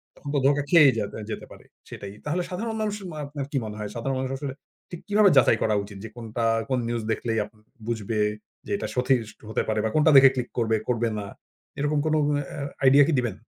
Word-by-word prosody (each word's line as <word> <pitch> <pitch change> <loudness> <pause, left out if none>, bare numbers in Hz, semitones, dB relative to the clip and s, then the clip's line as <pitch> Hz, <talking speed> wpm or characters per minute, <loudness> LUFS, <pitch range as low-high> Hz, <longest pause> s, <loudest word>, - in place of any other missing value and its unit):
তখন 145 - -9
তো - - +3
ধোঁকা 145 0 +3
খেয়েই 150 -6 +7
যাবে, 105 - -4
যেতে - - -5
পারে। - - -14 0.2
সেটাই। 100 0 -8
তাহলে 160 +5 0
সাধারণ 220 +5 -3
মানুষ 210 -1 -1 0.2
মা 155 - -8
আপনার 140 -1 -5
কি 140 - 0
মনে 105 - -6
হয়? 105 -1 -4
সাধারণ 130 +3 -2
মানুষ 130 0 -3
আসলে 140 -2 -4 0.4
ঠিক 175 - -7
কিভাবে 205 -1 +5
যাচাই 115 -3 +5
করা 110 -1 +2
উচিত? 100 0 -10
যে 110 - -6
কোনটা 115 0 -4 0.3
কোন 130 -2 +1
নিউজ 120 -2 -2
দেখলেই 115 +1 -1
আপ - - -15 0.4
বুঝবে 110 -2 -2 0.5
যে - - -7
এটা - - -4
সঠিক 125 -4 0
হতে - - 0
পারে 110 -1 0
বা - - +1
কোনটা 155 +1 +5
দেখে 135 0 +9
ক্লিক 125 -1 -3
করবে 115 -1 +2
করবে 115 -1 +1
না। 100 - -5 0.5
এরকম 145 +1 +1
কোন 155 - +2 0.3
অ্যা 140 - -6 0.2
আইডিয়া 140 +2 +7
কি - - +2
দিবেন? 120 -6 -2
130 Hz, 220 wpm, -25 LUFS, 110-145 Hz, 0.5 s, দেখে